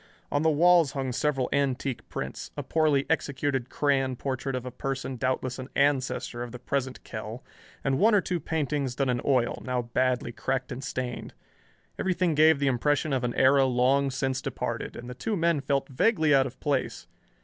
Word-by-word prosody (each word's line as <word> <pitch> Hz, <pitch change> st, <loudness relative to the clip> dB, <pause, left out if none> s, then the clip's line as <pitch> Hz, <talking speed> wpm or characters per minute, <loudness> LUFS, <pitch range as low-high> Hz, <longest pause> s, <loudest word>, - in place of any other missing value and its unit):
On 145 Hz, -, +1 dB
the 160 Hz, -, +3 dB
walls 165 Hz, 0 st, +4 dB
hung 135 Hz, -2 st, -2 dB
several 135 Hz, 0 st, 0 dB
antique 135 Hz, -2 st, -1 dB
prints, -, -, -5 dB
a -, -, -3 dB
poorly 155 Hz, -4 st, +2 dB
executed 140 Hz, -4 st, -1 dB
crayon 135 Hz, -3 st, +1 dB
portrait 135 Hz, +1 st, -3 dB
of 125 Hz, -1 st, -4 dB
a 125 Hz, -, -5 dB
person 135 Hz, +1 st, -4 dB
doubtless 130 Hz, +1 st, -2 dB
an 130 Hz, +1 st, -7 dB
ancestor 135 Hz, -3 st, 0 dB
of 120 Hz, -1 st, -5 dB
the 125 Hz, -, -7 dB
present 130 Hz, +1 st, -3 dB
Kell, 110 Hz, +2 st, -7 dB, 0.4 s
and 135 Hz, -1 st, +1 dB
one 220 Hz, 0 st, +5 dB
or -, -, +6 dB
two 180 Hz, -2 st, -2 dB
paintings 145 Hz, -4 st, -2 dB
done 135 Hz, -1 st, 0 dB
in 120 Hz, -1 st, -1 dB
oil, 130 Hz, -4 st, +1 dB
now 125 Hz, -1 st, -1 dB
badly 125 Hz, +1 st, 0 dB
cracked 130 Hz, +2 st, -2 dB
and 130 Hz, -, -5 dB
stained. 125 Hz, -3 st, -4 dB, 0.6 s
Everything 180 Hz, -2 st, +1 dB
gave 155 Hz, +1 st, +5 dB
the 140 Hz, -, -1 dB
impression 140 Hz, +3 st, +1 dB
of 130 Hz, -2 st, 0 dB
an 120 Hz, -1 st, -1 dB
era 135 Hz, +1 st, +5 dB
long 130 Hz, +2 st, +2 dB
since 130 Hz, 0 st, -1 dB
departed, -, -, -4 dB
and 120 Hz, -, -8 dB
the 125 Hz, -, -6 dB
two 200 Hz, -, -2 dB
men 165 Hz, -3 st, +2 dB
felt 140 Hz, -1 st, 0 dB
vaguely 155 Hz, -, +2 dB
out 135 Hz, -1 st, +4 dB
of 130 Hz, 0 st, -12 dB
place. 140 Hz, -3 st, -1 dB
135 Hz, 185 wpm, -27 LUFS, 125-145 Hz, 0.6 s, or